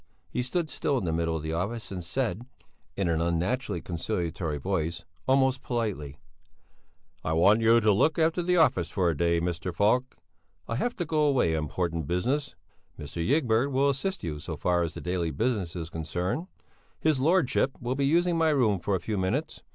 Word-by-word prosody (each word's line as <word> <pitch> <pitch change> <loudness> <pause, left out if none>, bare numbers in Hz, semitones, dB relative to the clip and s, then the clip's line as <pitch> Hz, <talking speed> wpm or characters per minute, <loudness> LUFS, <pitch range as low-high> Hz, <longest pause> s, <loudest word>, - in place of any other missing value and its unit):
He 125 - -1
stood 155 +5 -2
still 140 +1 0
in 120 - -2
the 80 - 0
middle 80 0 0
of 75 - -7
the 80 +1 -3
office 100 +8 -3
and 90 -2 -5
said, 115 +4 -2 0.5
in 100 -2 0
an 80 -1 +1
unnaturally 85 +5 -1
conciliatory 85 -3 -3
voice, 85 0 -2 0.2
almost 130 -1 +3
politely: 100 - -3 1.1
"I 80 - -1
want 100 +7 +5
you 115 +1 +6
to 110 -2 +3
look 150 +10 +2
after 165 +2 +2
the 180 +1 +2
office 90 - +3
for 90 -1 +1
a - - -3
day, 85 +3 +2
Mr. 85 +1 -2
Falk. 110 +9 +1 0.5
I 115 - -2
have 240 - -1
to 175 - -2
go 155 0 +1
away 125 - +2
on 80 -1 -1
important 85 -1 -2
business. 130 - -1 0.4
Mr. 75 +3 -5
Ygberg 130 - +2
will 140 +2 +3
assist 190 +9 -3
you 75 -3 -4
so - - -6
far 90 -1 +1
as 80 -2 -2
the - - -6
daily 90 -2 -1
business 105 -3 -1
is 85 -1 -5
concerned. 90 - -3 0.5
His 155 -4 +2
Lordship 145 -3 +2
will 120 +1 -2
be 140 +1 +1
using 170 +2 +2
my 160 -1 +4
room 120 -10 +2
for 100 +3 0
a - - -1
few 105 +3 -3
minutes. 135 +13 -2
105 Hz, 190 wpm, -28 LUFS, 85-135 Hz, 1.1 s, you